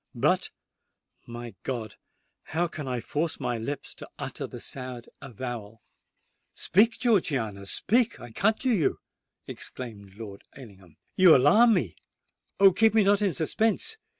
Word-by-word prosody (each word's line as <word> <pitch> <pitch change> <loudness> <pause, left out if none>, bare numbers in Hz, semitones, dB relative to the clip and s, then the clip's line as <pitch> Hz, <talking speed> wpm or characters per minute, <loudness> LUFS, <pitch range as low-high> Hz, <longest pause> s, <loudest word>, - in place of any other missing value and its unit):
But—my 120 0 -4
God!—how 130 - -5
can 150 -3 -7
I 125 -2 -2
force 155 +6 -2
my 120 -2 -2
lips 140 +5 -5
to - - -11
utter - - -5
the - - -9
sad 125 -2 -6
avowal——" 115 -4 -7 0.7
"Speak, 225 +5 +3
Georgiana—speak, 165 - +1
I 120 - -10
conjure 220 - +1
you!" 175 -8 +1 0.5
exclaimed 100 -6 -8
Lord 105 -3 -9
Ellingham: 95 - -14 0.2
"you 185 -3 +7
alarm 215 - +5
me! 115 - -2 0.6
Oh! 195 -1 +8
keep 220 +3 +3
me 220 - +5
not 200 +1 +3
in 195 -7 +1
suspense! 220 - 0
135 Hz, 125 wpm, -27 LUFS, -, 0.7 s, Oh